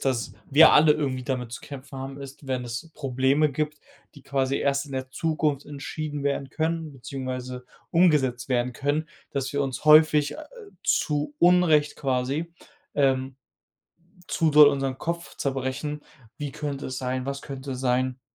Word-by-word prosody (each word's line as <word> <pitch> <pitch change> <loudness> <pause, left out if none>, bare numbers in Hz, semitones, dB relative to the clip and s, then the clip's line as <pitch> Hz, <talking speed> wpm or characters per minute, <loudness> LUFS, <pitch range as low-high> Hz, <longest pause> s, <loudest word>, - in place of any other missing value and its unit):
dass 130 -4 -1 0.2
wir 155 +4 +8
alle 150 0 +7
irgendwie 135 -4 -2
damit 125 -3 -3
zu 120 - -8
kämpfen 140 -1 -9
haben, 135 +1 -6
ist, 135 +1 -10
wenn 130 -1 -1
es 125 +7 -6
Probleme 135 +2 +1
gibt, 150 +1 -2 0.4
die 145 - -14
quasi 135 0 0
erst 140 0 0
in 140 - -11
der 130 0 -3
Zukunft 155 -1 -1
entschieden 145 +1 -5
werden 140 -1 -1
können, 160 0 -2
beziehungsweise 130 -1 -6 0.3
umgesetzt 145 -8 +2
werden 125 0 0
können, 150 +4 -1 0.2
dass 140 -1 -2
wir 140 - +1
uns 135 +3 -4
häufig, 150 -1 +6
äh, 310 - -8 0.4
zu 150 -1 0
Unrecht 170 -4 +4
quasi, 135 +5 -1 0.4
ähm, 135 -2 +1 0.9
zu 160 -1 +2
doll 150 -1 +9
unseren 135 -2 -1
Kopf 170 +2 -5
zerbrechen: 135 +2 -3 0.4
„Wie 145 -3 -4
könnte 145 -2 -4
es 130 -1 -4
sein? 130 0 -3
Was 140 0 -4
könnte 135 -1 -6
sein?“ 130 0 0
140 Hz, 155 wpm, -25 LUFS, 130-150 Hz, 0.9 s, doll